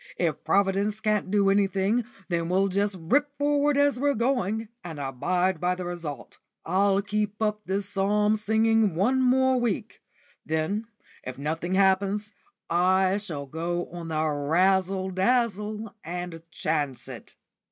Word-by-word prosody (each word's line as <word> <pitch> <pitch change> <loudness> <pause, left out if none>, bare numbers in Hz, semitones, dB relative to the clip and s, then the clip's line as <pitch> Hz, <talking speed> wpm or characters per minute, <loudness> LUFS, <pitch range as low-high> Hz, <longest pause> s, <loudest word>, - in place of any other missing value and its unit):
If 165 -4 -1
Providence 200 +2 +1
can't 215 -3 0
do 200 -1 +3
anything, 200 +3 +1 0.2
then 170 -2 -1
we'll 190 +2 +2
just 200 +1 0
rip 285 - +1
forward 290 0 +2
as 285 -3 +3
we're 285 +1 +2
going, 225 -3 0
and 165 -3 -7
abide 175 +7 0
by 180 +1 +1
the 180 0 -6
result. 170 -5 -6 0.3
I'll 195 +3 +2
keep 210 +1 -2
up 210 -1 0
this 195 +1 -1
psalm 210 +2 +2
singing 220 -2 +2
one 250 +9 +2
more 260 0 +3
week; 225 -2 -2 0.4
then, 160 +8 -2 0.4
if 130 0 -7
nothing 160 +6 -2
happens, 200 +2 +2 0.3
I 185 +2 +3
shall 160 -9 -5
go 170 +4 -3
on 170 -1 -7
the 155 -1 0
razzle 185 +6 +1
dazzle, 210 0 0
and 175 0 -5
chance 145 -8 -2
it." - - -10
195 Hz, 140 wpm, -26 LUFS, 175-215 Hz, 0.4 s, do